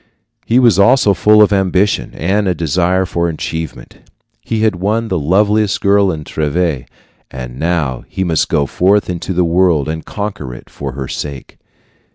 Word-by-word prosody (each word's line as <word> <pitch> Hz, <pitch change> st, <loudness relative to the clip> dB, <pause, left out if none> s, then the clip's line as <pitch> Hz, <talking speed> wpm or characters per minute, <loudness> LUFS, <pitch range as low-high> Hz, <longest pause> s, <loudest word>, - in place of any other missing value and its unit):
He 115 Hz, -, +3 dB
was 120 Hz, -7 st, +4 dB
also 110 Hz, -1 st, +4 dB
full 105 Hz, +2 st, +5 dB
of 105 Hz, -, +2 dB
ambition 95 Hz, +1 st, 0 dB
and 100 Hz, +5 st, 0 dB
of 90 Hz, -3 st, 0 dB
desire 90 Hz, +4 st, +1 dB
for 85 Hz, -2 st, -1 dB
achievement. 80 Hz, -1 st, -6 dB, 0.4 s
He 110 Hz, -1 st, -3 dB
had 110 Hz, -4 st, +1 dB
won 110 Hz, +5 st, -1 dB
the -, -, 0 dB
loveliest 105 Hz, +6 st, +1 dB
girl 100 Hz, -1 st, +3 dB
in 80 Hz, -2 st, -5 dB
Treves, 75 Hz, -2 st, -2 dB, 0.4 s
and 65 Hz, -1 st, -8 dB
now 80 Hz, -7 st, -1 dB
he 95 Hz, -, -3 dB
must 80 Hz, -4 st, 0 dB
go 70 Hz, -, +1 dB
forth 95 Hz, +6 st, +1 dB
into 90 Hz, +2 st, -5 dB
the 90 Hz, -1 st, +1 dB
world 85 Hz, -4 st, +2 dB
and 80 Hz, +1 st, -4 dB
conquer 100 Hz, -, -5 dB
it -, -, -14 dB
for 70 Hz, -2 st, -6 dB
her 65 Hz, -1 st, -5 dB
sake. 70 Hz, -3 st, -7 dB
90 Hz, 170 wpm, -15 LUFS, 80-100 Hz, 0.4 s, full